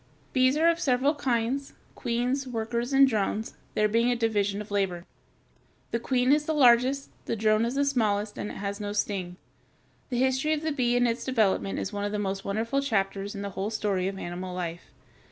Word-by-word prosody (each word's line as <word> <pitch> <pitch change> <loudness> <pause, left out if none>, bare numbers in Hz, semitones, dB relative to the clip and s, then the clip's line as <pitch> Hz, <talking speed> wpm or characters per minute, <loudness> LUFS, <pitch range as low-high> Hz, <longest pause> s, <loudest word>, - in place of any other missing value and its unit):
] - - -33
Bees 255 +2 +3
are 325 +2 +4
of 335 0 +3
several 270 0 +2
kinds, 265 -1 -1 0.2
queens, 250 +3 -1
workers, 235 +1 -2
and 275 0 +6
drones, 220 -2 -1 0.2
there 210 - +3
being 230 +3 +2
a 245 - +2
division 205 -3 0
of 210 0 -8
labor. 185 -4 -1 0.9
The 235 - 0
queen 250 +1 +1
is 295 +1 +3
the 315 - -1
largest, 260 +1 +4 0.2
the - - 0
drone 215 +1 +2
is 240 +3 -2
the 280 0 +2
smallest, 215 -6 0
and 210 - -3
it - - -7
has 200 +1 -4
no 205 -1 -4
sting. 190 -4 -2 0.7
The 245 - -2
history 260 +4 +2
of 310 0 -2
the 315 - 0
bee 245 -4 +1
and 245 0 +3
its 230 +1 -1
development 215 -6 +1
is 195 - -3
one 205 0 -3
of 205 - -1
the 210 - -1
most 195 -1 -2
wonderful 225 +7 -1
chapters 200 -5 -1
in 200 - -5
the 200 - -4
whole 195 +2 -3
story 200 -4 -1
of 195 0 -4
animal 180 0 -5
life. 175 -1 -4
225 Hz, 210 wpm, -27 LUFS, 200-260 Hz, 0.9 s, and